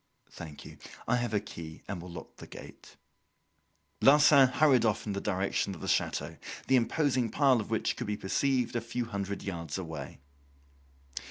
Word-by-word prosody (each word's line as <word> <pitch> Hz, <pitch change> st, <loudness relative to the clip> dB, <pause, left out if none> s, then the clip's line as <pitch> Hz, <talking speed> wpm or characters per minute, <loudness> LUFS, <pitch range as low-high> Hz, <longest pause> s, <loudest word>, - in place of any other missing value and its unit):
"Thank 80 Hz, -4 st, -10 dB
you. -, -, -12 dB, 0.3 s
I -, -, +3 dB
have 120 Hz, -2 st, -2 dB
a 105 Hz, -, +2 dB
key 80 Hz, -5 st, -9 dB
and 95 Hz, -4 st, -5 dB
will 90 Hz, -, -9 dB
lock 85 Hz, -2 st, -10 dB
the -, -, -11 dB
gate." -, -, -12 dB, 1.1 s
Larsan 140 Hz, -1 st, +7 dB
hurried 130 Hz, -2 st, +4 dB
off 110 Hz, -1 st, 0 dB
in 105 Hz, -, -2 dB
the 100 Hz, -, -3 dB
direction 95 Hz, 0 st, -1 dB
of -, -, -12 dB
the -, -, -5 dB
chateau, -, -, -1 dB, 0.3 s
the 130 Hz, -, +3 dB
imposing 130 Hz, -1 st, +1 dB
pile 135 Hz, -4 st, +3 dB
of -, -, -8 dB
which 110 Hz, -1 st, 0 dB
could 120 Hz, -, -5 dB
be 105 Hz, 0 st, -2 dB
perceived 125 Hz, +4 st, 0 dB
a 120 Hz, -, 0 dB
few 115 Hz, +1 st, -3 dB
hundred 100 Hz, -2 st, -4 dB
yards 85 Hz, -5 st, -4 dB
away. 80 Hz, -7 st, -6 dB
110 Hz, 175 wpm, -30 LUFS, 95-125 Hz, 1.1 s, Larsan